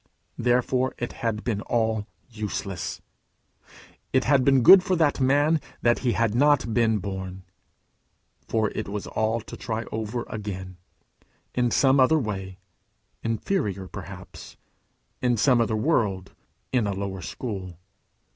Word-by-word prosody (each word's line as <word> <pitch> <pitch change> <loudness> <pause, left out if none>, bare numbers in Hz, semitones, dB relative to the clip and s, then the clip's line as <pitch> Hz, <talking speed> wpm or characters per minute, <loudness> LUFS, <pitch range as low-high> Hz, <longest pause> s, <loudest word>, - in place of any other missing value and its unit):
Therefore 125 +2 +1
it 120 - -4
had 110 -2 -3
been 105 -4 -1
all 110 -2 0 0.2
useless. 105 -5 -5 1.1
"It 130 -1 +3
had 135 -2 +3
been 135 -2 +4
good 190 +9 +10
for 185 0 0
that 155 -4 +2
man 145 +4 +3 0.2
if 120 0 +3
he 125 -3 +1
had 115 -3 +1
not 135 -2 +3
been 115 -2 +3
born;" 95 -1 -6 1.0
for 110 -2 0
it - - -4
was 105 0 -4
all 110 +1 -1
to - - -10
try 115 -1 -3
over 110 +2 -3
again, 95 -4 -6 0.8
in 125 -1 +1
some 135 +3 +4
other 130 +5 +5
way 95 -7 -4 0.6
inferior 110 - -2
perhaps, - - -10 0.6
in 125 -2 +2
some 125 +1 +4
other 110 -1 0
world, 105 - 0 0.4
in 120 -5 +2
a 100 - -1
lower 95 -1 -4
school. 95 -3 -6
115 Hz, 135 wpm, -25 LUFS, 100-130 Hz, 1.1 s, good